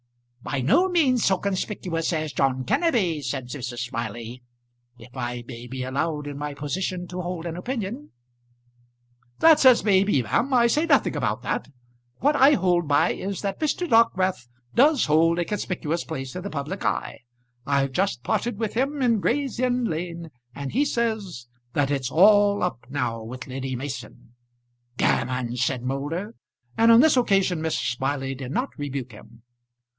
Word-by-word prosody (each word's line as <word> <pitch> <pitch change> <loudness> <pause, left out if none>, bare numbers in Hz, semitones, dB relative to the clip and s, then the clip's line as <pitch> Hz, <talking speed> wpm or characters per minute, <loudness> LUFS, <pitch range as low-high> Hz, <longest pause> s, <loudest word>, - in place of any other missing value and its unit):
"By 135 +1 -3
no 350 - +3
means 275 - +2
so 190 - +3
conspicuous 185 -4 -2
as 155 -3 -2
John 130 0 +1
Kenneby," 185 - +1
said 125 -1 -4
Mrs. 125 -2 -5
Smiley, 120 0 -5 0.6
"if 120 +2 -15
I 120 -1 -4
may 120 -1 -8
be 130 +1 -5
allowed 150 +3 -2
in 145 -1 -6
my 145 -1 -4
position 180 +5 -3
to 180 0 -4
hold 175 -1 -5
an 170 -1 -4
opinion." 235 +6 -5 1.3
"That's 325 -3 +6
as 255 -2 +7
may 195 -3 +4
be, 170 -11 +1
ma'am. 245 - 0
I 245 -2 +4
say 300 +8 +2
nothing - - +3
about - - -1
that. - - -2 0.5
What 290 +3 +2
I 280 +1 +6
hold 175 - +1
by 145 0 +3
is, 195 0 -4
that 195 -1 -3
Mr. 320 +3 -1
Dockwrath 190 - +2 0.3
does 285 +2 +4
hold 165 +2 +3
a 175 - 0
conspicuous 175 -4 -3
place 135 -5 -6
in 180 - -4
the 200 - -5
public 155 +5 -5
eye. - - -2 0.5
I've 140 -1 +1
just 185 -5 -1
parted 235 +6 -1
with 220 -1 -2
him 275 +3 -1
in 230 -3 +3
Gray's 265 +4 -1
Inn 250 0 +1
Lane, 170 -2 -4 0.2
and 140 -1 -5
he 270 +6 +2
says 220 - -2 0.3
that 145 -1 +1
it's 135 -3 -1
all 205 +4 +5
up 125 -10 -3
now 125 -5 -2
with 125 +3 -8
Lady 130 0 -4
Mason." 125 -2 -7 0.6
"Gammon!" 125 -1 0
said 125 0 -1
Moulder. 145 - -3 0.4
And 230 +1 +5
on 230 +1 +8
this 315 -1 +5
occasion 195 -8 +2
Mrs. 160 -6 -1
Smiley 135 +1 -2
did 130 -1 -7
not 255 - -1
rebuke 140 -4 -4
him. 115 +2 -15
165 Hz, 165 wpm, -24 LUFS, 130-215 Hz, 1.3 s, on